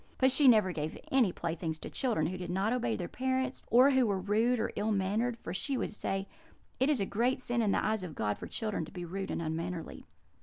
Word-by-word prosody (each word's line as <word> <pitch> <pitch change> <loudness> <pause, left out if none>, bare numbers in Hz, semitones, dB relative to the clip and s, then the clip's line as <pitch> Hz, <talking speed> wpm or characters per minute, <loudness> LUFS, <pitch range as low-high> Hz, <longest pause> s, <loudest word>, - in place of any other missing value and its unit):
But 260 0 +4
she 280 +1 +5
never 215 -6 +6
gave 155 -2 -4
any 250 -8 +4
playthings 165 -2 -3
to - - -8
children 230 - 0
who 180 +4 -2
did 180 - -5
not 195 +5 +1
obey 240 -2 0
their 175 - -4
parents, 260 0 -1
or 255 +4 +6
who 260 -3 +3
were 200 -2 +1
rude 220 +6 +2
or 225 - -1
ill 215 +1 0
mannered, 215 +5 0
for 170 - -6
she 270 +8 -2
would - - -2
say, 195 -2 -3 0.5
'It 265 - +3
is 290 -5 +2
a 195 - +1
great 235 +6 0
sin 240 -2 0
in 210 -3 +2
the - - +1
eyes 215 -1 0
of 180 -4 -7
God 105 -1 -1
for - - -6
children 215 -6 -3
to - - -13
be 180 -3 -6
rude 190 +3 -4
and - - -2
unmannerly.' 165 +2 -4
210 Hz, 240 wpm, -31 LUFS, 180-245 Hz, 0.5 s, never